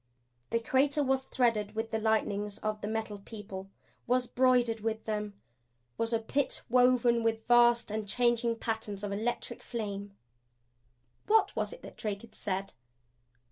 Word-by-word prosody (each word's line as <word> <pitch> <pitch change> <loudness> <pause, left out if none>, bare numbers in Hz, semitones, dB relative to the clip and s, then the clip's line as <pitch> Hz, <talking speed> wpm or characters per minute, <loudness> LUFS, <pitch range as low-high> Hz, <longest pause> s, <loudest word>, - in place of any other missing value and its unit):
The 230 - +1
crater 280 +5 +2
was 265 0 0
threaded 220 -4 +1
with 225 0 -2
the 220 - 0
lightnings 210 -2 0
of 215 0 -3
the 205 - -3
Metal 220 -1 -3
People; 195 -2 -8 0.4
was 250 +1 +2
broidered 245 -2 +3
with 220 0 -3
them; 210 -2 -3 0.6
was 230 0 -1
a 230 - +3
Pit 255 +5 -1
woven 245 -1 +4
with 225 -1 -1
vast 240 -2 +5
and 215 -1 -3
changing 235 0 +2
patterns 220 -3 -3
of 205 - -2
electric 220 +4 -3
flame. 200 -3 -5 1.1
What 440 +1 +4
was - - -1
it - - -11
that - - -11
Drake 205 -3 -3
had 235 - -14
said? 195 -1 -3
225 Hz, 150 wpm, -31 LUFS, 210-240 Hz, 1.1 s, vast